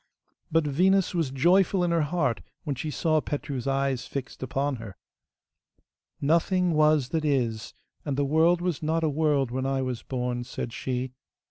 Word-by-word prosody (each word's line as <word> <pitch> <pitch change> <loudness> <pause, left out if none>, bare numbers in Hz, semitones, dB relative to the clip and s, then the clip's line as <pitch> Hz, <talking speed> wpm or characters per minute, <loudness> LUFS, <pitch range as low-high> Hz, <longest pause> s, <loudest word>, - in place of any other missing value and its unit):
But 165 0 +3
Venus 185 +7 +2
was 165 -6 0
joyful 180 +7 +3
in 175 - +1
her 165 -1 +2
heart 145 -6 0 0.2
when 145 -4 -2
she 155 +5 -4
saw 155 +1 +1
Petru's 140 -3 -4
eyes 135 -2 0
fixed 135 -2 -6
upon 135 +1 -1
her. 110 -4 -9 1.2
'Nothing 170 +4 +2
was 150 -4 +3
that 160 -2 -1
is, 120 -7 -1 0.3
and 140 -2 -2
the 145 - +2
world 165 +4 +3
was 175 -4 -1
not 160 +1 0
a 160 - +2
world 145 -4 +1
when 130 +1 -1
I 135 -1 0
was 125 -2 -3
born,' 125 -1 -3
said 120 -1 -6
she. 130 0 -3
145 Hz, 165 wpm, -27 LUFS, 130-165 Hz, 1.2 s, But